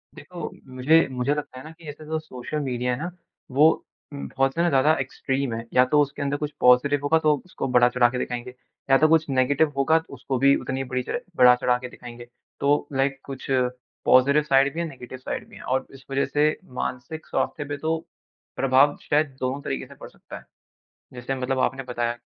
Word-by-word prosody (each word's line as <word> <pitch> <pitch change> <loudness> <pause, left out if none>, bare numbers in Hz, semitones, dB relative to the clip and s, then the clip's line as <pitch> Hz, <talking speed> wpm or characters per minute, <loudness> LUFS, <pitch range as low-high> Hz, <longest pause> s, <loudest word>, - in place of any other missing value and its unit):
देखो - - -7 0.3
मुझे 155 +6 +4
मुझे 125 +2 0
लगता 145 -3 -6
है 130 - -9
ना 155 - -10
कि 165 0 -17
ऐसे 150 +1 -10
जो 160 +1 -2
सोशल 150 0 -6
मीडिया 125 -3 -1
है - - -3
ना 175 - -3 0.5
वो 150 +3 +7 0.5
उम 140 - -6
बहुत 135 0 +1
ज़्यादा 155 -3 +3
एक्सट्रीम 135 -1 -2
है। 115 +1 -5
या 125 0 +6
तो 150 - +5
उसके 145 0 -2
अंदर 140 +1 -1
कुछ 150 0 -4
पॉजिटिव 125 +3 +5
होगा 160 +3 +3
तो 155 -1 +3
उसको 185 - -5
बढ़ा-चढ़ा 120 0 +5
के 125 - -4
दिखाएँगे 125 0 -4 0.4
या 135 - +7
तो 155 - +4
कुछ 160 -2 +3
नेगेटिव 135 +3 +2
होगा 160 +4 +4
तो 160 - -14
उसको 130 0 -3
भी 140 +1 +5
उतनी 135 0 -3
बुरी 125 -1 -3
तरह - - -3 0.2
बढ़ा-चढ़ाके 125 0 +4
दिखाएँगे। 120 -1 -11 0.3
तो 145 +1 +2
लाइक 135 0 0
कुछ 135 -1 -8 0.6
पॉजिटिव 140 +4 +5
साइड 140 -1 +3
भी 170 - -5
है, 170 - -1
नेगेटिव 130 -2 -10
साइड 130 - -5
भी - - -15
हैं - - -11
और 130 +1 -1
इस 135 -1 -14
वज़ह 135 +1 +1
से 150 +1 +4 0.3
मानसिक 155 +6 -5
स्वास्थ्य 145 - -2
पे 145 0 -4
तो, 160 +2 -1 0.6
प्रभाव 135 +2 +3
शायद 145 -2 +1
दोनों 130 +2 -2
तरीक़े - - -4
से - - -14
पड़ - - -11
सकता - - -11
है। - - -15 0.7
जैसे 125 +2 -4
मतलब 130 0 -2
आपने 135 +1 0
बताया। 120 -1 -2
135 Hz, 200 wpm, -24 LUFS, 125-150 Hz, 0.7 s, वो